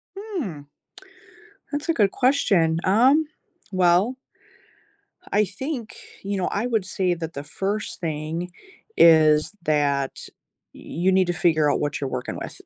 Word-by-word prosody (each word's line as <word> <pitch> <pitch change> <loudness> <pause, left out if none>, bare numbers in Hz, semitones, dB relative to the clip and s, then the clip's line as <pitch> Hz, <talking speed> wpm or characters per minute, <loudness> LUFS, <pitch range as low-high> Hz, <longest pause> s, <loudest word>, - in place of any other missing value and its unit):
Hmm. 310 - -6 1.1
That's 295 +3 -4
a - - +4
good 205 -7 +2
question. 200 - +2
Um, 260 +11 +4 0.5
well 185 +6 +3 1.2
I 210 +1 +3
think 240 +4 -6 0.3
you 200 0 -2
know, 185 - -1
I 220 +5 -1
would 225 -6 0
say 185 -1 0
that 165 -1 -6
the 140 - -6
first 195 +7 -4
thing 160 +2 -4 0.5
is 155 -1 +6
that 145 -3 +1 0.6
y - - -14 0.3
you - - +6
need 185 -1 +3
to 175 - 0
figure 155 -3 +2
out - - 0
what 145 0 -2
you're 135 - -2
working 125 -1 -4
with. - - -8
185 Hz, 140 wpm, -23 LUFS, 155-220 Hz, 1.2 s, is